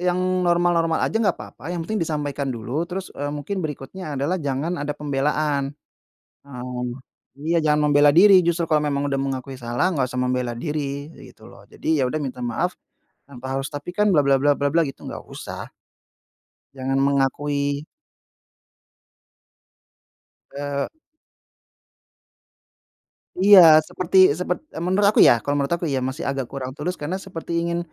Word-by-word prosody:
e - - -7
yang 180 - +1 0.3
normal-normal 170 -1 +2
aja, 225 - -1
nggak 215 - +1
papa, - - -12
yang 170 -2 -3
penting 215 +3 -2
disampaikan 145 -3 -2
dulu, 120 -1 -5 0.2
terus, 185 +1 -6
eee, 145 +1 -4
mungkin 185 +7 -4
berikutnya 150 +2 -6
adalah 145 +8 0
jangan 145 +4 -2
ada 145 0 -2
pembelaan. 145 0 -1 0.7
Heeh. 125 -2 -6 0.5
Iya, 165 +4 0
jangan 150 0 +3
membela 145 0 +6
diri 195 +5 +7
justru 170 0 +1
kalau 155 -1 +3
memang 140 0 -1
udah 135 - -1
mengakui 135 -1 -4
salah, 120 +5 -1
nggak 135 -4 +1
usah 125 0 -2
membela 125 -1 -1
diri, 145 0 -4 0.2
gitu - - -18
loh. - - -15
Jadi 160 -1 -1
ya 135 - +2
udah 155 - -2
minta 125 -1 -6
maaf, 145 +9 -2 0.5
tanpa 130 -1 -10
harus, 135 +1 -2
"Tapi 145 +4 -6
kan 210 - +3
bla 155 - +5
bla 135 0 +4
bla 145 +1 +4
bla," 145 +4 +1
gitu 135 -3 -7
nggak - - -7
usah. - - -7 1.1
Jangan 135 0 -2
mengakui 140 +1 0 2.7
Eee 140 0 -3 2.6
Iya, 200 -1 +9 0.2
seperti 185 +3 -2 0.2
sepert 180 0 -1
eee, - - -7
menurut 195 +3 +3
aku - - +1
ya - - +8
kalau 145 - -1
menurut 140 +4 0
aku 170 - -4
ya, - - +1
masih 130 +5 -4
agak 135 -3 -2
kurang 130 -2 -5
tulus, 175 +5 -3
karena 165 +6 -2
seperti 170 -3 -7 0.2
ingin, 170 0 -1
145 Hz, 155 wpm, -22 LUFS, 135-170 Hz, 2.7 s, Iya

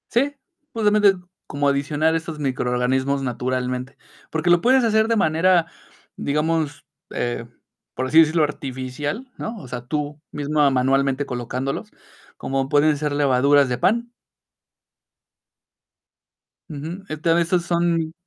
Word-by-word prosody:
Sí, 280 +4 +1 0.4
justamente, 210 -2 +4 0.3
como 145 0 -1
adicionar 145 +3 +1
esos 165 -1 -4
microorganismos 130 0 0
naturalmente, 125 +1 -3 0.3
porque 160 +2 -1
lo 175 -1 +5
puedes 260 +3 +4
hacer 220 -1 +3
de 230 - +2
manera, 170 -1 +3 0.5
digamos, 150 +1 -1 0.3
eh, - - -3 0.5
por 130 +1 -2
así 160 +5 +5
decirlo, 160 0 +4
artificial, 145 - -4
¿no? 225 +1 -5
O 140 - -10
sea, 125 0 -6
tú 145 +2 -4
misma, 150 0 +1
manualmente, 135 +1 +1
colocándolos, 125 +1 -4 0.5
como 135 0 -2
pueden 150 +1 +3
ser 150 0 -2
levaduras 140 0 +3
de 125 - -1
pan. 235 - +1 2.6
Ujú. 160 +5 -6
Este, 155 +2 -2
a - - +6
veces 170 +1 +1
son 170 -2 0
150 Hz, 120 wpm, -22 LUFS, 135-170 Hz, 2.6 s, a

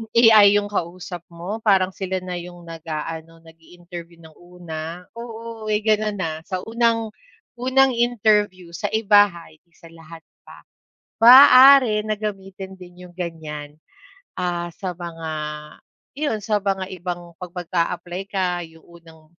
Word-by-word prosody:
AI 215 -3 +7
yung 205 0 0
kausap 175 -1 -5
mo 175 +6 -6
parang 195 -4 +2
sila 190 -1 -4
na 180 -1 -5
yung 175 0 -11
nag 165 -1 -11
aano, 165 +1 -6
nag-i-interview 170 +1 -13
ng 160 - -14
una. 175 -1 -8 0.2
Oo, 230 -1 -8
may 210 0 0
gano'n 215 -1 +1
na 160 -4 -3
sa 185 -2 -4
unang, 230 -1 0 0.5
unang 265 +1 +3
interview 210 -7 +1
sa 205 +4 -3
iba 205 -1 +5
ha? 170 -4 -13
Hindi 165 +2 -26
sa 165 -2 -16
lahat 165 0 -13 0.2
pa, - - -14 0.6
maaari 255 -2 +8
na 215 - 0
gamitin 195 -2 -7
din 180 0 -14
yung - - -22
gan'yan. 150 -4 -6 0.6
Ah, 175 -2 -3
sa 185 -2 -5
mga 165 -2 -7 0.8
'yon, 265 -8 -3
sa 210 -1 0
mga 195 -1 -2
ibang 175 -1 -6
pag 180 - -6
mag-apply 175 +1 -3
ka, 180 -3 -1
yung 160 0 -20
unang, 165 -2 -18
180 Hz, 140 wpm, -22 LUFS, 170-210 Hz, 0.8 s, maaari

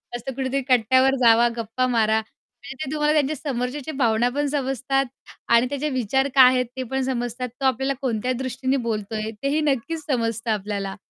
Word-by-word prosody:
मस्त 240 +3 -6
कुठेतरी 270 0 -1
कट्ट्यावर 260 +2 +4
जावा, 230 +1 +6
गप्पा 230 +3 -1
मारा 220 -2 +2
म्हणजे 240 +4 -14
ते 270 - -6
तुम्हाला 300 0 +1
त्यांच्या 305 0 +1
समोरच्याच्या 275 +2 -4
भावना 235 -2 +2
पण 290 0 0
समजतात 270 -1 0 0.4
आणि 235 +2 +5
त्याचे 285 +2 -2
विचार 260 +1 0
काय 260 -1 +9
आहेत, 250 0 +1
ते 260 - -2
पण 265 0 0
समजतात, 245 -1 -3
तो 270 - 0
आपल्याला 265 +2 +1
कोणत्या 250 -1 -1
दृष्टीने 260 +1 -1
बोलतोय 215 0 -3
तेही 290 +3 +1
नक्कीच 300 +2 -1
समजतं 230 -3 -1
आपल्याला. 200 -1 -3
255 Hz, 170 wpm, -23 LUFS, 230-270 Hz, 0.4 s, काय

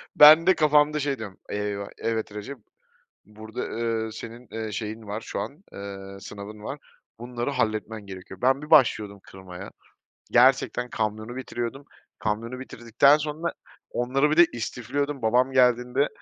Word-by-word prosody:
Ben 155 +3 +9
de 190 - +6
kafamda, 150 -1 +4
şey, 140 -1 -1
diyorum, 105 -4 -8
eyvah 105 -1 -3
evet 110 -2 -2
Recep, 105 +7 -6 0.7
burada, 110 +1 -9
ııı, 115 -1 -2
senin, 115 +2 -9
ııı, 110 -1 -4
şeyin 110 +2 -5
var 105 +2 -4
şu - - -5
an, 155 +8 -7
ııı, 100 0 -8
sınavın 105 +2 -9
var, 145 - -5 0.4
bunları 120 +2 -3
halletmen 110 -4 -2
gerekiyor. 95 +2 -10
Ben 135 +3 +3
bir 150 - -9
başlıyordum 110 -9 +4
kırmaya, 95 0 -10 0.6
gerçekten, 125 -1 +4
kamyonu 110 +2 -3
bitiriyordum, 130 +1 -5 0.3
kamyonu 115 +4 -3
bitirdikten 125 +3 +3
sonra 155 +2 -3 0.4
onları 135 +4 +1
bir 155 - +1
de 175 0 +8
istifliyordum 130 +4 -3
babam 125 +4 +3
geldiğinde, 125 +2 +3
120 Hz, 140 wpm, -26 LUFS, 105-135 Hz, 0.7 s, Ben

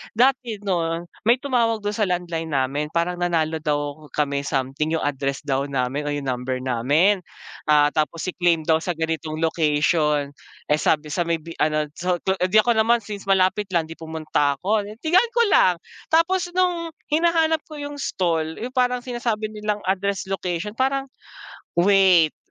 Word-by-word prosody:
dati 245 -1 +2
‘no, 170 -3 -1 0.2
may 235 - +7
tumawag 235 -5 0
dun 205 - -1
sa 210 -1 0
landline 175 -2 -2
namin. 140 +3 0
Parang 170 +2 -1
nanalo 160 -2 0
daw 145 0 -3
kami 140 -1 -1
something, 140 +3 -1
yung - - -2
address 140 -1 -2
daw 140 -1 -1
namin, 140 +2 -2
o 145 - -1
yung 145 - -4
number 130 0 -3
namin. 145 - +2 0.5
Ah, 150 -1 +5
tapos 155 +1 -1
i-claim 175 -3 +1
daw 160 +1 +3
sa 175 +1 -3
ganitong 160 -1 -3
location. 150 -2 +1 0.4
Eh 150 - +3
sabi 150 -1 +1
sa 170 +2 -1
may 170 - +2
bi 165 +1 -9
ano 155 0 +2 0.2
sa 180 +1 +1
do 190 - +1
eh, 180 - +2
‘di 215 +3 +5
ako 240 - +2
naman 230 +1 +3
since 200 -1 -8
malapit 195 +1 +2
lang 165 -1 0
‘di 165 - -10
pumunta 155 -3 -1
ako. 205 +7 0 0.2
Tingnan 360 +9 +4
ko 470 - +4
lang, 180 - +5 0.3
tapos 350 +3 +2
nung 345 -3 0 0.2
hinahanap 320 0 +3
ko 310 - -10
yung 290 0 -6
stall 165 -8 -1
yung 245 +3 -6
parang 250 -1 +1
sinasabi 235 -4 -2
nilang 210 -1 -3
address 195 0 -1
location 185 +1 -2
parang, 270 0 0 0.6
wait, 185 -3 +4
175 Hz, 170 wpm, -23 LUFS, 150-220 Hz, 0.6 s, may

